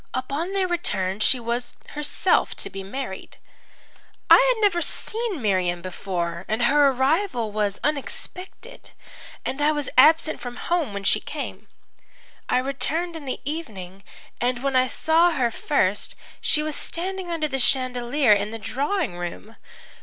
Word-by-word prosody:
Upon 280 +8 -2
their 385 -2 +1
return 200 - -1
she 250 +4 +3
was 240 +1 -3 0.2
herself 295 0 +1
to - - -4
be 195 - -6
married. 195 0 -6 0.9
"I - - +12 0.2
had - - -7
never 360 -4 +3
seen 430 - -2
Miriam 180 -4 +1
before. 175 -2 -3
Her 245 +6 +4
arrival 265 - +1
was 205 -1 -1
unexpected, 365 - -5 0.5
and 270 - -2
I 300 +1 +4
was 295 -2 -2
absent 315 +3 +5
from 245 -1 -6
home 315 - -1
when 200 - -4
she - - +3
came. - - -7 0.8
I - - +3
returned 310 +6 -1
in 315 -3 -7
the 260 - -4
evening, 195 - -6 0.4
and 245 +1 0
when 275 -1 0
I 255 0 +4
saw 330 +6 +3
her 245 -5 +1
first 205 -8 0 0.3
she 300 - +3
was 305 -1 -3
standing 370 +1 -4
under 325 -3 -1
the 270 -2 -3
chandelier 255 -1 +3
in 205 +1 0
the 225 - -5
drawing 270 - -2
room. 175 +5 -6
265 Hz, 145 wpm, -24 LUFS, 215-320 Hz, 0.9 s, I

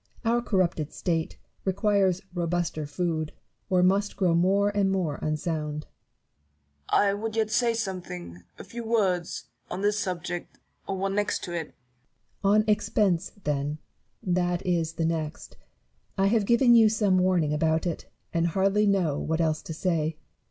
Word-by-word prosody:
Our 235 +1 +3
corrupted 175 -9 0
state 165 -2 -2 0.3
requires 195 -1 +2
robuster 170 -3 -1
food, 155 0 -2 0.4
or 180 -1 +3
must 200 +2 +2
grow 180 -4 +3
more 195 +4 +3
and 195 -2 +2
more 175 -7 -1
unsound. 155 -1 -2
Newton. - - -33 1.0
I 200 -1 +4
would 220 +2 -4
yet 220 -1 +1
say 235 +1 +2
something; 175 - -5 0.2
a - - -8
few 235 +5 -7
words; 195 -7 0 0.3
on 190 - -4
this 205 +1 +2
subject 175 -2 -4
— - - -40
or 195 - -2
one 195 +1 -1
next 205 +1 0
to 175 - -5
it. 165 -3 -4 0.7
Barrow. 200 +1 +4
On 215 - +5
Expense, 205 -3 +1
then: 145 0 -1 0.5
that 175 0 0
is 165 -3 0
the 165 0 -1
next. 160 -2 -3 0.6
I 195 - +3
have 215 -2 +2
given 240 +1 +5
you 225 -2 +7
some 205 -4 +2
warning 180 -5 +2
about 160 +2 +1
it, 170 -3 -3 0.3
and 170 0 +2
hardly 195 +4 +2
know 180 -8 +2
what 160 +1 -1
else 155 -2 +1
to - - -8
say. 160 -3 0
180 Hz, 160 wpm, -27 LUFS, 160-200 Hz, 1.0 s, you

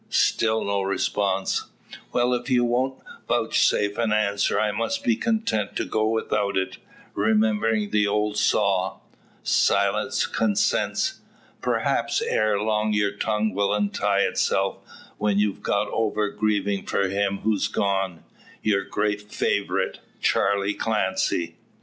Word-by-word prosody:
Still 110 0 +2
no 100 0 0
response. 95 0 -1 0.4
"Well; 125 +1 +2
if 120 +2 -3
you 125 -2 +3
won't 125 +2 0 0.3
vouchsafe 105 +1 +1
an 115 -2 +1
answer, 100 -2 +1
I 105 -1 +1
must 280 - -2
be 240 -3 +3
content 220 - -1
to - - -1
go 110 0 0
without 105 -3 0
it; 95 -1 -2 0.4
remembering 110 0 +1
the 105 -1 +3
old 105 +1 0
saw 100 -2 +1 0.5
`Silence - - +2
consents.' 105 -3 0 0.4
Perhaps, - - 0
ere 110 -2 +1
long 105 0 0
your 105 -1 +2
tongue 105 0 -1
will 100 +1 +1
untie 100 -1 +1
itself; - - +1 0.4
when 105 -1 +1
you've 105 -1 0
got 100 +1 0
over 105 -2 0
grieving 100 -2 0
for 100 - +1
him 100 0 -1
who's 110 -2 +1
gone 95 -4 -1 0.4
your 100 -2 +2
great 105 0 -2
favourite, 100 - -1 0.2
Charley 100 0 +1
Clancy. 95 -6 -1
105 Hz, 125 wpm, -24 LUFS, 100-110 Hz, 0.5 s, you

